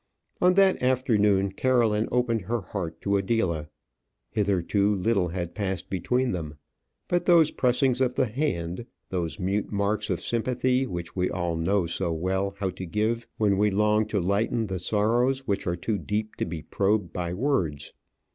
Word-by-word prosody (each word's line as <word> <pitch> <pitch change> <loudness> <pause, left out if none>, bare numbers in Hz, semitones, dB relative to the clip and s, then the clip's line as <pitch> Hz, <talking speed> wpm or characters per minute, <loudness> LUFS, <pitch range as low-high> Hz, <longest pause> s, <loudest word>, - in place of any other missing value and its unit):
On 180 0 +5
that 195 -1 +4
afternoon, 105 -7 +2
Caroline 115 -1 +2
opened 120 -2 +1
her 115 +2 -1
heart 85 -3 -5
to 100 0 +1
Adela. 95 -7 0 0.6
Hitherto 100 0 +1
little 95 -1 +1
had 85 0 -4
passed 95 -3 -3
between 125 +7 0
them, 80 -4 -5 0.5
but 175 0 0
those 170 -4 +5
pressings 125 0 +2
of 125 -1 +1
the 130 - +2
hand, 110 - -2 0.2
those 90 +1 -3
mute 100 +2 -1
marks 100 +1 0
of - - 0
sympathy 125 +2 0
which 85 -5 -6
we 90 -1 +1
all 85 -2 -2
know 90 +3 +1
so 85 +1 -2
well 95 +4 -1
how 95 -2 -1
to 95 +1 -7
give 110 +6 -1
when 100 -3 +2
we 105 0 +4
long 105 +2 +2
to 105 -1 0
lighten 100 +5 0
the 95 -3 -4
sorrows 120 +8 +1
which 100 -4 -2
are 85 - +1
too 100 +4 -2
deep 105 +1 -3
to - - -1
be 80 -2 -6
probed 100 -3 0
by 85 -1 -3
words. 90 - -1
105 Hz, 165 wpm, -26 LUFS, 90-120 Hz, 0.6 s, On